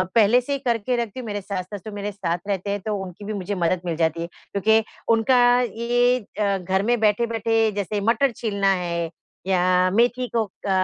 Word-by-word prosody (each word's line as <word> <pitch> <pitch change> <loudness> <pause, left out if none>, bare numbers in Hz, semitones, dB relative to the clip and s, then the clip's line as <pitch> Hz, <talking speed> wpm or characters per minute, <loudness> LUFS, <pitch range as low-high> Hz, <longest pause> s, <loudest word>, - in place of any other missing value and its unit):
पहले 230 +2 +6
से 280 +3 -3
ही 275 - -1
करके 240 0 0
रखती 235 0 -3
हूँ। 250 - -6
मेरे 205 -1 -3
सास-ससुर 200 +2 -6
मेरे 205 0 -4
साथ 175 -4 -2
रहते 200 -1 -2
हैं, 205 - -1
तो 215 +1 -2
उनकी 185 +2 -9
भी 215 - -3
मुझे 200 0 -3
मदद 175 0 0
मिल 170 -2 -1
जाती 165 0 0
है, 170 - -3 0.2
क्योंकि 220 +3 +3 0.3
उनका 230 +3 +3 0.2
ये 245 +2 +1 0.2
अ, 200 -2 +2
घर 190 +1 -1
में 240 +2 +1
बैठे-बैठे 225 +1 +2
जैसे 205 +1 -2
मटर 235 +5 +2
छीलना 200 -3 -1
है 170 -2 -2 0.4
या 185 -1 +3
मेथी 245 +3 +2
को 225 -2 +2 0.2
क - - -1
205 Hz, 195 wpm, -23 LUFS, 190-230 Hz, 0.4 s, पहले